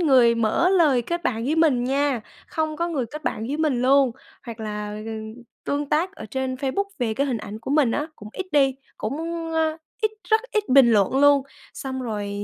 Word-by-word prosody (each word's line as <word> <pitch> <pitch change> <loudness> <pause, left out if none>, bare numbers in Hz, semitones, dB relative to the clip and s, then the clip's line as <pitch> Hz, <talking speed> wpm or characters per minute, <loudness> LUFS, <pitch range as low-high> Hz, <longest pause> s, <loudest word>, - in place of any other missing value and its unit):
người 255 -8 +5
mở 230 +10 +2
lời 305 -10 +4
kết 345 +8 -3
bạn 230 -8 -1
với 300 +5 0
mình 285 -7 +3
nha, 275 -1 +1 0.3
không 315 -1 -2
có 340 +2 -1
người 275 -8 -2
kết 300 +6 -9
bạn 220 - -2
với 285 +4 -2
mình 295 -6 +1
luôn, 270 0 +5 0.3
hoặc 230 -3 -8
là 210 -1 -4 0.7
tương 285 0 -2
tác 335 +6 +1
ở 220 - -9
trên 260 +3 -2
Facebook 275 +9 -1
về 230 -4 0
cái 280 +5 0
hình 250 -4 -1
ảnh 210 0 -7
của 225 +4 -7
mình 285 -5 +3
á, 295 +6 -1
cũng 210 -1 -10
ít 380 - -5
đi, 270 -3 +4 0.2
cũng, 215 +5 -3 0.4
ơ, 320 -1 +1 0.3
ít 435 - +3 0.2
rất 440 0 +4
ít 425 -3 0
bình 260 -2 +7
luận 210 +2 +3
luôn. 285 -1 +6 0.3
Xong 260 -1 -5
rồi 210 -4 -3
270 Hz, 210 wpm, -24 LUFS, 235-310 Hz, 0.7 s, bình